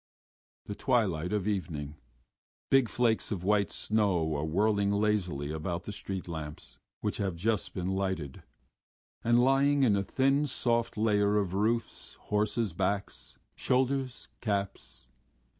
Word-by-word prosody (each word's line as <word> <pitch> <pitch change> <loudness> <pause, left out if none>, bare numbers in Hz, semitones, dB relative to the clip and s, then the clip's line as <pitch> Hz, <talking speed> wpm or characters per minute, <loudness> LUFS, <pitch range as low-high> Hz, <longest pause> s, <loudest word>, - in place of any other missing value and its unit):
THE 105 - -5
twilight 100 - 0
of 105 -2 -1
evening. 80 -8 -3 0.8
Big 135 -4 +5
flakes 115 -1 +1
of 95 -4 -3
wet 100 +1 +2
snow 95 -8 +1
are 70 - -2
whirling 100 +5 +2
lazily 100 -9 0
about 85 +3 -3
the - - -6
street 95 -2 -5
lamps, 80 -3 -7 0.2
which - - -1
have 95 -4 -1
just 105 +3 -1
been 90 0 -2
lighted, 95 -8 -2 0.8
and 120 +1 +4
lying 135 +3 +4
in 110 -6 +4
a 100 - +1
thin 135 +7 +1
soft 115 -3 0
layer 105 -1 +3
on 100 -3 -1
roofs, 110 +5 -1
horses' 105 -1 -1
backs, 100 +3 -3 0.2
shoulders, 130 0 0
caps. 100 - -3
100 Hz, 130 wpm, -30 LUFS, 90-115 Hz, 0.8 s, Big